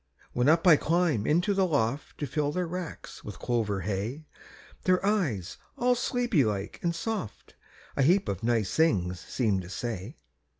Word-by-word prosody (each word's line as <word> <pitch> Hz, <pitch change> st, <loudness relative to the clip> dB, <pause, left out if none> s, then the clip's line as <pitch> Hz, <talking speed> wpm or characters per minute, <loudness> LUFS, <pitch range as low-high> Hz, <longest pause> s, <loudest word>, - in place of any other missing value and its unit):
When 125 Hz, +3 st, +3 dB
up 165 Hz, +3 st, +4 dB
I 165 Hz, -4 st, +8 dB
climb 160 Hz, -10 st, +1 dB
into 175 Hz, +7 st, +3 dB
the 190 Hz, -1 st, +2 dB
loft 140 Hz, -3 st, -1 dB
To 145 Hz, -, -2 dB
fill 145 Hz, +2 st, -1 dB
their 180 Hz, +3 st, -1 dB
racks 175 Hz, -1 st, -7 dB
with 105 Hz, -, -8 dB
clover 110 Hz, -5 st, -1 dB
hay, 105 Hz, -, -3 dB, 0.6 s
Their 185 Hz, +1 st, +3 dB
eyes, 145 Hz, -, 0 dB, 0.2 s
all 250 Hz, +1 st, +3 dB
sleepy 245 Hz, -, +1 dB
like 105 Hz, -3 st, -3 dB
and 170 Hz, -1 st, 0 dB
soft, 210 Hz, -, -4 dB, 0.4 s
A -, -, +1 dB
heap 180 Hz, +8 st, +4 dB
of 95 Hz, -, -2 dB
nice 115 Hz, -4 st, 0 dB
things 90 Hz, -, +2 dB
seem 105 Hz, 0 st, 0 dB
to 90 Hz, -, -10 dB
say. 110 Hz, -, -5 dB
145 Hz, 165 wpm, -28 LUFS, 105-180 Hz, 0.6 s, I